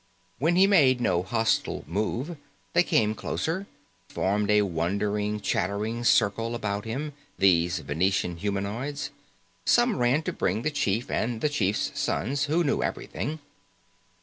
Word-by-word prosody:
When 165 +6 +2
he 190 +2 +6
made 145 -11 +5
no 90 -7 +1
hostile 110 +4 0
move, 110 - -2 0.4
they 170 - +5
came 110 -10 +2
closer 160 +7 -2
again, 195 +2 -7 0.4
formed 100 +2 0
a 105 0 +5
wondering, 100 +4 -1
chattering 105 +4 -1
circle 115 +1 +2
about 105 -2 -3
him, 140 +7 -4 0.2
these 85 -2 +3
Venusian 85 +3 0
humanoids. 110 - -3 0.5
Some 240 -4 +3
ran 125 +5 +2
to 185 - -3
bring 110 - -1
the 155 - 0
chief 115 -5 -1
and 115 0 -1
the 150 - +1
chief's 105 -9 0
son, 130 +7 -1
who 165 +4 +2
knew 145 - +1
everything. 150 +6 -3
110 Hz, 140 wpm, -27 LUFS, 100-145 Hz, 0.5 s, he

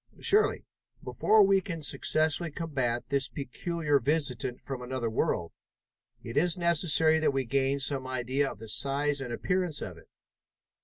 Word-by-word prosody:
"Surely. 420 +2 +3 0.4
Before 215 -1 +4
we 195 0 +4
can 165 -3 -6
successfully 155 +3 +1
combat 135 -7 -2
this 140 -1 0
peculiar 145 +2 -1
visitant 130 -3 -1
from 135 -2 -6
another 125 -2 -3
world, 85 -6 -1 0.7
it 115 - -6
is 175 +3 +2
necessary 160 -2 +3
that 155 -3 +1
we 135 -1 -1
gain 135 +3 +1
some 135 -1 -2
idea 130 +2 -1
of - - -9
the 110 +2 -10
size 140 +5 0
and 125 -3 -5
appearance 180 +4 -1
of - - -7
it. - - -20
140 Hz, 150 wpm, -29 LUFS, 130-160 Hz, 0.7 s, Before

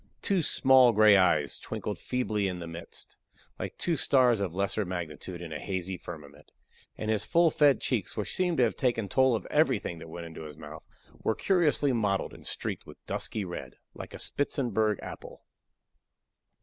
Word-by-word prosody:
Two 195 -3 +2
small 130 -5 +5
gray 105 -1 +7
eyes 80 -7 +2
twinkled - - -5
feebly 110 -5 -1
in 90 -1 -3
the 85 - -6
midst, 85 +1 -9 0.4
like - - -5
two 170 - 0
stars 125 -5 +4
of 95 -4 -1
lesser 100 +4 -1
magnitude 90 -1 -6
in 80 -2 -7
a 75 - -4
hazy 95 -1 -3
firmament; 75 -4 -11 0.5
and 110 0 -2
his 110 - +1
full 170 -1 +3
fed 145 -3 +4
cheeks, 115 -6 -2
which 105 - -3
seemed 180 -3 +1
to 125 - +4
have 115 - +1
taken 120 -5 0
toll 130 +4 +3
of 105 - -4
everything 130 - +1
that 80 - -10
went 85 +1 -7
into 80 -1 -9
his 75 -2 -9
mouth, 80 0 -10 0.4
were 110 - 0
curiously 155 -7 +2
mottled 100 -4 0
and - - -11
streaked - - -4
with - - -12
dusky 105 -3 -2
red, 90 - -7 0.2
like - - -9
a - - -6
Spitzenberg 110 -7 0
apple. - - -9
105 Hz, 175 wpm, -29 LUFS, 85-130 Hz, 0.5 s, gray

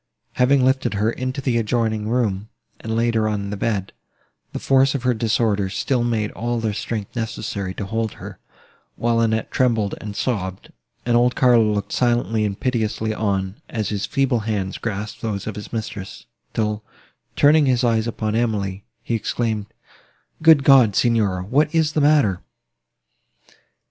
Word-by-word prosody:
Having 130 +1 +3
lifted 130 -4 +1
her 105 +3 +1
into 130 +3 -4
the 125 -3 +1
adjoining 110 -1 0
room, 110 -4 -1 0.3
and 110 0 -4
laid 115 +1 +1
her 110 -1 +1
on 100 -1 -3
the - - -2
bed, 100 -2 -2 0.6
the - - -5
force 135 0 +3
of 130 - -3
her 125 -1 +3
disorder 110 -3 0
still 120 +5 0
made 110 -3 -1
all 120 0 -2
their 110 -2 -1
strength 105 +1 -4
necessary 105 -4 -4
to 100 - -4
hold 110 +1 -2
her, - - -10 0.6
while 115 0 +1
Annette 110 -1 0
trembled 115 -6 +1
and 105 -1 -6
sobbed, 95 -7 -3 0.3
and 120 -1 +2
old 120 +1 +3
Carlo 120 -4 +4
looked 105 -1 -2
silently 120 -3 +1
and 100 -1 -3
piteously 110 -3 -1
on, 100 -2 -2
as 110 -3 -2
his 100 -1 -2
feeble 130 0 +1
hands 105 -3 -3
grasped 105 -1 -4
those 105 -4 -3
of 110 - -4
his 105 - -8
mistress, 105 -4 -6 0.3
till, 105 -1 -1 0.5
turning 150 0 +5
his 125 -1 +2
eyes 115 -1 +2
upon 110 -2 -2
Emily, 105 -4 -1 0.2
he - - -3
exclaimed, 110 -2 -1 0.7
"Good 160 -3 +6
God! 130 -7 +6
Signora, 105 -6 +2
what 145 - +1
is 155 -2 +2
the 155 - +1
matter?" 140 -11 +3
110 Hz, 160 wpm, -21 LUFS, 105-125 Hz, 0.7 s, Good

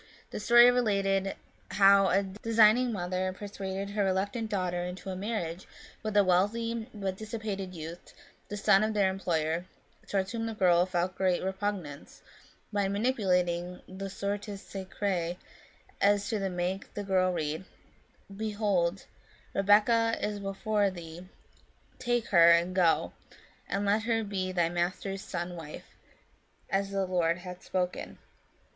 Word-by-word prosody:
The - - -4
story 240 +3 +7
related 195 -5 +1 0.3
how 195 0 +6
a 195 +2 +3
designing 220 +4 +3
mother 185 -1 -2
persuaded 200 -1 -5
her 205 0 0
reluctant 200 +4 -1
daughter 180 -3 -1
into 180 +2 -6
a - - -4
marriage 185 -4 -4 0.3
with 215 -1 -2
a 205 - +7
wealthy 220 +5 +1
but 195 -3 -3
dissipated 210 -4 -5
youth, 165 +2 -8 0.4
the 205 - -5
son 205 0 +4
of 215 0 -1
their 195 -2 +3
employer, 170 -3 -1 0.4
towards 195 -1 -1
whom 225 -1 -3
the 225 - -4
girl 180 -2 +4
felt 180 0 -1
great 185 -1 +1
repugnance, 190 -6 -4 0.5
by 200 -1 +1
manipulating 180 -5 0
the 195 +1 -6
Sortes 200 +1 -4
Sacrae 190 -3 -3
so - - -26
as 205 0 +3
to 200 -4 -1
make 180 +2 -3
the 205 - -3
girl 185 -2 +2
read, 155 0 -2 0.4
" - - -37 0.3
Behold, 200 -4 0 0.5
Rebekah 220 +3 +4
is 210 -1 -2
before 200 +1 0
thee, 175 0 -10 0.7
take 240 -2 0
her, 170 -3 +7
and 170 +2 +4
go, 175 -3 +2 0.6
and 200 +1 -1
let 205 +2 +2
her 225 0 0
be 190 -3 -3
thy 175 -2 +2
master's 180 +3 -2
son's 175 -1 -4
wife, 160 -3 -9 0.9
as 195 0 +1
the 195 -1 -1
Lord 175 -2 +1
hath 180 0 -9
spoken." 180 -1 -3
195 Hz, 140 wpm, -29 LUFS, 180-205 Hz, 0.9 s, story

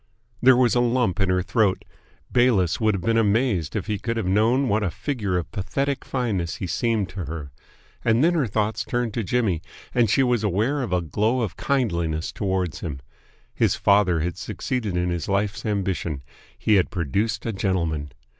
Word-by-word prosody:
There 125 0 +7
was 125 -4 +4
a 120 - +3
lump 120 -6 +1
in 95 -1 +2
her 90 0 +2
throat. 100 -1 +1 0.5
Bayliss 115 -8 +3
would 110 -2 +3
have 90 - -4
been 115 +3 +2
amazed 105 - +1
if - - -2
he 105 -2 -2
could 115 +2 -2
have 115 - -1
known 115 +8 +3
what 110 -1 +1
a 100 - 0
figure 105 - -2
of 85 - -4
pathetic 135 +7 -2
fineness 105 -10 -2
he - - -4
seemed 105 +3 0
to 95 -3 -5
her. 75 -2 -6 0.5
And 115 +3 +3
then 170 +2 +4
her 150 -7 +1
thoughts 110 +2 -1
turned 120 -1 -2
to 115 - -1
Jimmy, 100 -5 0 0.3
and 120 -3 +3
she 135 - +4
was 120 -3 +1
aware 110 +9 +1
of 120 -7 -3
a 90 -1 +2
glow 110 - 0
of 100 -7 -2
kindliness 85 - -1
towards 95 -5 -2
him. 70 -5 -5 0.5
His - - +2
father 100 -5 +3
had 85 +1 -3
succeeded 110 -8 -3
in 90 0 0
his 85 +1 -3
life's 100 +3 -1
ambition. 95 -8 -2 0.3
He 105 -2 +3
had 95 - +2
produced 100 - -1
a 115 - -1
gentleman! 85 -7 -1
105 Hz, 190 wpm, -24 LUFS, 90-120 Hz, 0.5 s, There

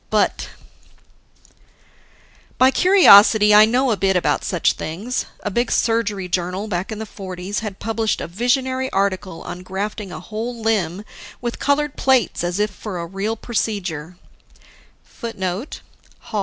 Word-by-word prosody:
But - - 0 2.1
By 260 +1 +5
curiosity, 220 - +7
I 210 +1 +8
know 250 +3 +1
a - - +2
bit 190 -1 +1
about 180 - +1
such 175 -4 +1
things. 205 +11 -4 0.2
A 205 - -2
big 240 +4 0
surgery 210 -5 0
journal, 180 +3 -2
back 185 -1 -3
in 215 - -4
the 220 - -5
'40s, 190 -1 -6
had 210 -3 -6
published 225 0 -1
a - - -4
visionary 260 +7 0
article 190 -3 -2
on 180 - -7
grafting 195 +2 -5
a - - -7
whole 230 +2 -5
limb, 210 -4 -1 0.3
with 240 -1 -4
colored 285 0 0
plates 260 -10 +2
as 175 +2 -2
if 210 0 +1
for 200 -1 -7
a 170 - -4
real 195 +6 -3
procedure[A]. 180 -9 -3
210 Hz, 135 wpm, -20 LUFS, 185-230 Hz, 2.1 s, I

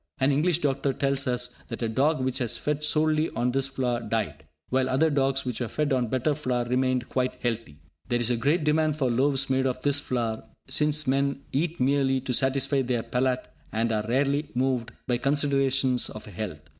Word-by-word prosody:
An 135 +2 +3
English 155 +4 +2
doctor 140 -1 0
tells 135 0 0
us 125 0 -1
that 115 0 -5
a - - +1
dog 135 +5 +1
which 130 +1 -1
was 120 -4 -1
fed 150 0 -2
solely 155 +1 +2
on 120 +2 +1
this 135 +1 0
flour 125 -3 -1
died, 115 -8 -3 0.2
while 130 0 +1
other 155 +5 +3
dogs 135 -1 +1
which 125 -3 -3
were 120 - -1
fed 145 +5 0
on 125 -2 +1
better 130 +6 +1
flour 125 -4 -1
remained 125 0 +1
quite 130 -1 -1
healthy. 115 -10 -2 0.3
There 120 -1 +2
is 120 0 0
a - - +3
great 145 +8 +1
demand 155 0 +2
for 135 -5 0
loaves 135 +2 +2
made 130 0 +2
of 130 -1 -2
this 145 0 +2
flour, 115 -5 -2 0.2
since 150 0 +1
men 140 +1 0
eat 165 +4 -1
merely 135 0 +2
to 130 -1 -3
satisfy 135 +2 +1
their 120 -3 -1
palate, 125 0 0 0.2
and 115 +1 0
are 105 -1 -1
rarely 140 +4 +1
moved 125 -2 0
by 120 -1 0
considerations 135 -2 +1
of 105 - -9
health. 95 -6 -6
130 Hz, 195 wpm, -26 LUFS, 125-140 Hz, 0.3 s, An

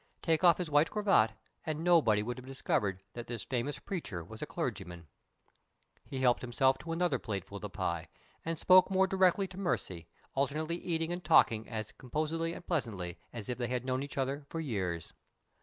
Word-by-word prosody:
Take 165 +1 +2
off 170 -3 +7
his 175 -4 -3
white 145 +2 +4
cravat, 195 - +3 0.3
and 155 0 -3
nobody 150 -12 +4
would 120 +3 -4
have 125 - -11
discovered 100 -7 -1
that 120 -1 -7
this 120 -2 -5
famous 130 +2 -2
preacher 140 - -5
was 110 +7 -10
a 150 - -3
clergyman! 95 - -4 1.0
He 135 -1 -5
helped 125 -2 +4
himself 130 +2 +2
to 165 - -6
another 165 -5 +1
plateful 100 -6 -5
of - - -10
the - - -5
pie, 85 -1 -2 0.4
and 165 0 -2
spoke 185 +4 +6
more 190 0 +4
directly 190 0 +3
to 185 - -9
Mercy, 90 - -2 0.3
alternately 155 +5 -1
eating 165 -1 -2
and 175 0 -5
talking 115 -8 +4
as 110 -2 -4
composedly 155 +5 -2
and 175 - -9
pleasantly 100 - -2
as 115 -4 -7
if 125 -1 -3
they 120 - 0
had 125 0 -2
known 130 0 0
each 140 0 -7
other 135 +2 -1
for 165 - -4
years. 95 - -3
135 Hz, 190 wpm, -32 LUFS, 110-165 Hz, 1.0 s, off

